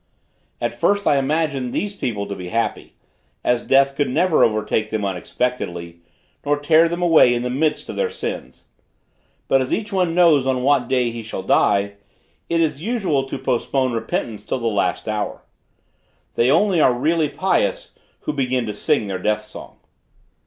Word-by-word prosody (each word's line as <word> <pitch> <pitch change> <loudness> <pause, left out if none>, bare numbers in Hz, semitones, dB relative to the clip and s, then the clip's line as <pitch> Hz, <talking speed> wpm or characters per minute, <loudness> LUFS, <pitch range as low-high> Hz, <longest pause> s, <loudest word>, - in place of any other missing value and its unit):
At - - -2
first 205 0 +1
I 145 - +4
imagined 140 -3 -1
these 205 0 -2
people 110 - -3
to 100 - -5
be 90 -2 -7
happy, 115 +3 -2 0.5
as 125 -1 0
death 135 0 +4
could 145 0 0
never 170 +6 +3
overtake 110 0 0
them 110 -2 -2
unexpectedly, 90 -3 -3 0.4
nor 145 0 +1
tear 160 +3 +4
them 170 +1 -3
away 160 -8 +5
in 120 - -2
the 125 - -2
midst 150 +3 -1
of - - -7
their 480 -2 0
sins. - - -6 0.8
But 135 - +3
as 130 - -3
each 210 -1 -2
one 180 -3 +1
knows 160 -7 +4
on 130 -1 0
what 135 -3 +2
day 125 -2 +1
he 115 0 -6
shall 110 -4 -6
die, 100 0 +2 0.5
it 165 0 +2
is 150 -3 -1
usual 185 - 0
to - - -4
postpone 130 +1 0
repentance 115 -2 -3
till 105 - -3
the 120 - -6
last 105 0 -1
hour. 105 -1 -3 0.9
They 120 - +2
only 175 +3 +3
are 125 - +5
really 155 +4 +1
pious - - -1 0.3
who 150 - -3
begin 130 -3 -1
to 105 - -4
sing 105 - +1
their 95 -2 -4
death 105 +2 0
song. 105 - -11
130 Hz, 175 wpm, -21 LUFS, 110-160 Hz, 0.9 s, away